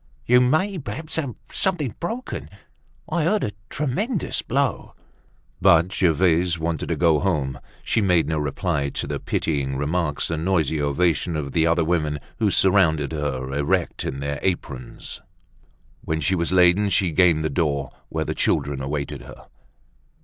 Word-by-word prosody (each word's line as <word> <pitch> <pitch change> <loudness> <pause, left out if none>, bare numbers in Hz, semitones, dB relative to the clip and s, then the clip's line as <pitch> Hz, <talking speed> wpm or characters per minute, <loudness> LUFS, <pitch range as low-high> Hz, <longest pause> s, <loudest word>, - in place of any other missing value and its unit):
"You 125 +1 +5
may, 170 +10 +1
perhaps, 145 +6 -6
have 140 -7 -2 0.2
something 160 - 0
broken. 230 +9 -4 0.6
I 170 - 0
heard 200 +7 +1
a 105 - -1 0.2
tremendous 170 - -1
blow." 135 -3 -1 0.7
But 90 -1 +5
Gervaise 85 -1 +2
wanted 80 -1 -2
to - - +1
go 80 -3 +3
home. 75 -9 -1 0.2
She 115 - +1
made 90 -5 +3
no 80 -1 0
reply 75 0 -1
to - - -3
the - - -3
pitying 70 -4 -1
remarks 75 +1 -1
and 80 -1 -2
noisy 80 -5 +1
ovation 80 +3 +1
of 70 -3 -3
the 80 +2 +2
other 85 0 +3
women 75 -3 0 0.2
who 110 -3 +3
surrounded 85 -7 +3
her, 70 -4 -3
erect 70 0 0
in 70 +1 -4
their 70 0 -3
aprons. 70 -9 -4 0.8
When 80 0 -1
she 80 +5 +1
was 85 -2 0
laden 90 +3 +4
she 95 -2 +2
gained 85 -2 +4
the 80 - -1
door, 70 -4 -1 0.2
where - - -2
the - - -2
children 70 -2 0
awaited 70 +1 -3
her. - - -12
85 Hz, 155 wpm, -23 LUFS, 75-100 Hz, 0.8 s, You